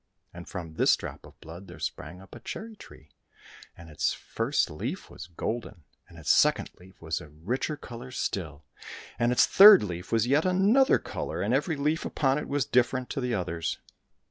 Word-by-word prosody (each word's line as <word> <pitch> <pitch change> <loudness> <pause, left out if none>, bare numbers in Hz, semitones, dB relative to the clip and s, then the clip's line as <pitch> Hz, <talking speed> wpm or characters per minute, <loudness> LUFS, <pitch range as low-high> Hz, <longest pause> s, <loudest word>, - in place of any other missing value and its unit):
And 85 0 -10
from 85 -4 -7
this - - +4
drop - - -9
of - - -20
blood 85 +4 -11
there - - -11
sprang 90 +5 -6
up 95 - -17
a 120 - -10
cherry 220 - -7
tree; - - -15 0.7
and 85 - -12
its 75 -2 -1
first 115 - -1
leaf 120 - -6
was 85 -2 -10
golden, 105 0 -5 0.3
and 85 - -15
its 80 - 0
second - - +3
leaf 90 +1 -18
was 80 0 -3
of 75 +3 -16
richer 135 +5 -1
colour 120 -2 -10
still, 80 - -4 0.6
and 120 0 +2
its 125 - +5
third 200 - +9
leaf 90 -3 -6
was 115 -1 +2
yet 140 +5 +2
another 200 +9 +4
colour, - - -5
and - - 0
every 160 - 0
leaf 150 +3 -1
upon 135 -1 0
it - - -6
was 140 -3 0
different 125 +2 +1
to 135 - -3
the 125 -2 -1
others. 85 -3 -3
115 Hz, 190 wpm, -27 LUFS, 85-140 Hz, 0.7 s, third